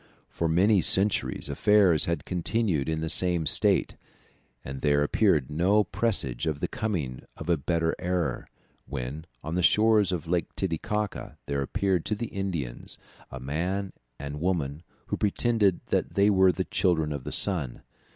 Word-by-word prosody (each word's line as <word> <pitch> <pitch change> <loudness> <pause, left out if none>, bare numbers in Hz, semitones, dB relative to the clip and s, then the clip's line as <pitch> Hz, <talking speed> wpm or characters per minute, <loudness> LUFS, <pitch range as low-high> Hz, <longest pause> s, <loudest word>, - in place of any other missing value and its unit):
For 85 - -1
many 95 +4 +4
centuries 95 +5 +1
affairs 100 -7 +4
had 85 0 -2
continued 90 -4 -1
in 80 0 -2
the 80 - -2
same 90 -1 +2
state, - - +2 0.7
and 65 0 -6
there 75 -1 +2
appeared 75 - +1
no 95 +7 +3
presage 85 - -1
of 75 -2 -2
the - - -1
coming 80 - -3 0.2
of 80 - -8
a 85 - +4
better 80 +2 -1
era, 90 -7 -2 0.4
when, 70 +4 -6 0.2
on 80 - -5
the 90 - 0
shores 105 +2 +4
of 85 -3 -3
Lake 85 +1 -2
Titicaca, 100 +4 -3
there 70 0 -2
appeared 90 +5 0
to 105 - -1
the 115 +2 -5
Indians 85 -11 -5 0.3
a 70 - -8
man 90 +9 -3 0.2
and 70 +2 -7
woman, 80 -5 -1 0.2
who - - -3
pretended 105 -2 +1
that - - -1
they 100 +1 +4
were 95 -1 +5
the 85 - -3
Children 80 -4 0
of 70 -3 -6
the - - -6
Sun. 80 -11 +3
85 Hz, 160 wpm, -27 LUFS, 75-100 Hz, 0.7 s, were